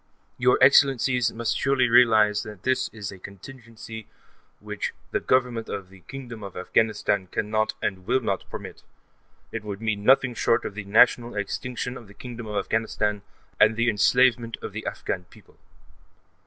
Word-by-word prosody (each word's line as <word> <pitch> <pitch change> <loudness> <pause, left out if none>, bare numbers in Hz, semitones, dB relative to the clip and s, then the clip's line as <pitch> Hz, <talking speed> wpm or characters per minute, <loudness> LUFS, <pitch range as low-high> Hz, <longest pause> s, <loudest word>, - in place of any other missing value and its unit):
Your 125 0 +4
Excellencies 130 -3 +4
must 115 0 -2
surely 135 -2 +2
realize 110 -3 +5
that 105 -3 -10
this 130 0 0
is 105 -4 -7
a 95 - -12
contingency 110 +2 -11 0.5
which - - -5 0.2
the - - 0
Government 125 -3 0
of 100 -2 -6
the 95 - -15
Kingdom 120 +4 -9
of 100 -2 -8
Afghanistan 100 0 0
cannot 110 +3 -1
and 95 -1 -3
will 130 +2 +3
not 100 -6 -3
permit; - - -8 0.7
it 115 -1 -5
would 100 -2 -6
mean 110 -2 -2
nothing 130 +1 +4
short 115 +1 +1
of - - -4
the 100 0 -7
national 120 +3 +4
extinction 125 +4 -4
of 115 - -13
the 100 - -16
Kingdom 120 0 -8
of 105 - -5
Afghanistan, 105 -2 -1 0.4
and 110 +1 +5
the 115 +1 +2
enslavement 120 +2 +2
of - - -5
the - - -6
Afghan 90 - -4
people. - - -21
110 Hz, 160 wpm, -25 LUFS, 105-125 Hz, 0.7 s, realize